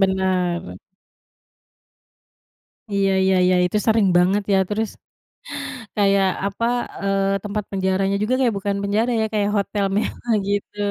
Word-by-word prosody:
bener. 185 - 0 2.2
Iya 195 -1 +2
iya 190 - +3
iya. 185 - +3
Itu 180 +4 -1
sering 220 -2 +4
banget, 190 +4 +3
ya. 195 - +4
Terus, 215 +1 -1 1.1
kayak, 200 -1 +3 0.2
apa, 200 +3 -2 0.4
eee, 195 0 0
tempat 210 0 -3
penjaranya 195 0 0
juga 215 +4 0
kayak 240 -5 +2
bukan 200 0 -2
penjara 215 +4 +1
ya, 220 - +1
kayak 205 -1 +1
hotel 200 0 -1
mewah, 225 +2 -1
gitu. 205 0 -2
200 Hz, 125 wpm, -21 LUFS, 190-210 Hz, 2.2 s, sering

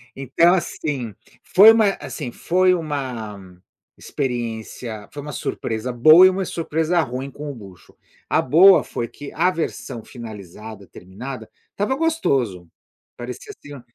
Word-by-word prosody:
Então, 135 +6 +3
assim, 140 - -3 0.3
foi 210 +4 +7
uma 225 -2 +4
assim, 135 -6 -6
foi 185 +7 +2
uma 120 - -5 0.4
experiência 115 -4 -5
foi 145 - -7
uma 150 +1 -7
surpresa 115 -2 -4
boa 155 +9 +8
e - - +7
uma 190 +1 -2
surpresa 165 +1 -1
ruim 130 -1 -5
com 150 +1 -8
o 140 - -7
bucho. 95 -6 -15 0.3
A - - +3
boa 180 +8 +6
foi 120 - -5
que, 145 +4 -10
a 175 +3 +2
versão 120 -9 -5
finalizada 105 -3 -10
terminada 110 +6 -9 0.2
estava 210 +6 -1
gostoso. 135 - -1 0.5
Parecia, 125 - -8
assim, 145 - -13
ó, 135 - -11
135 Hz, 140 wpm, -21 LUFS, 110-170 Hz, 0.5 s, boa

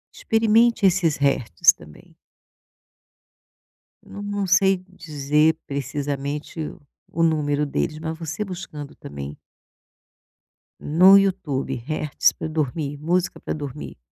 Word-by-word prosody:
Experimente 225 0 +3
esses 175 -5 +3
hertz 130 - +3
também. 75 0 -17 1.9
Não 205 - -10
não 205 -1 -2
sei 195 +1 +4
dizer 150 -2 +1
precisamente 140 +2 -4
o 155 +2 -7 0.3
o 165 - 0
número 150 -3 +1
deles, 150 +1 -2
mas 160 0 -5
você 165 +4 -4
buscando 175 -7 -8
também 70 0 -8 1.4
no 185 +6 +6
YouTube: 175 -9 0
hertz 150 +2 +1
pra - - -5
dormir, 150 -1 -2
música 175 +5 -1
pra - - -4
dormir, 125 - -7
155 Hz, 105 wpm, -23 LUFS, 140-185 Hz, 1.9 s, no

